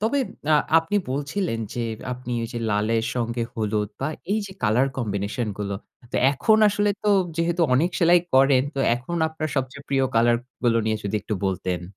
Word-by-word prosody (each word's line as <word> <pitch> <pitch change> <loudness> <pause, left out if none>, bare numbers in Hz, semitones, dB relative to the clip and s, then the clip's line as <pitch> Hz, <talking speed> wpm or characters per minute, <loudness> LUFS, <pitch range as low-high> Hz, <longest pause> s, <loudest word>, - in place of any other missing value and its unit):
তবে 230 +7 +1 0.3
আ - - +7 0.2
আপনি 165 +6 -1
বলছিলেন, 145 - -2 0.2
যে 120 - -2 0.3
আপনি 125 0 -7
ওই - - -2
যে - - -2
লালের 110 +2 +1
সঙ্গে 120 -1 -1
হলুদ 105 -1 -1
বা 135 - 0 0.2
এই 215 - +2
যে 190 - -9
কালার 120 +5 +3
combination 105 +1 -2
গুলো। 100 -1 -3 0.4
তো - - 0 0.2
এখন 215 +10 +3
আসলে 205 0 +1
তো 210 - 0 0.3
যেহেতু 170 +1 +1
অনেক 165 +8 +2
সেলাই 175 +1 +6 0.2
করেন 135 -1 +5
তো 140 - -5 0.2
এখন 130 +8 -5
আপনার 160 0 -4
সবচেয়ে 135 +2 -3
প্রিয় 135 -1 +2
কালার 120 +1 +4 0.3
গুলো 115 -1 +3
নিয়ে 110 0 +1
যদি 100 +2 -1
একটু 105 - -3
বলতেন। 90 -2 -2
125 Hz, 180 wpm, -24 LUFS, 110-160 Hz, 0.4 s, আ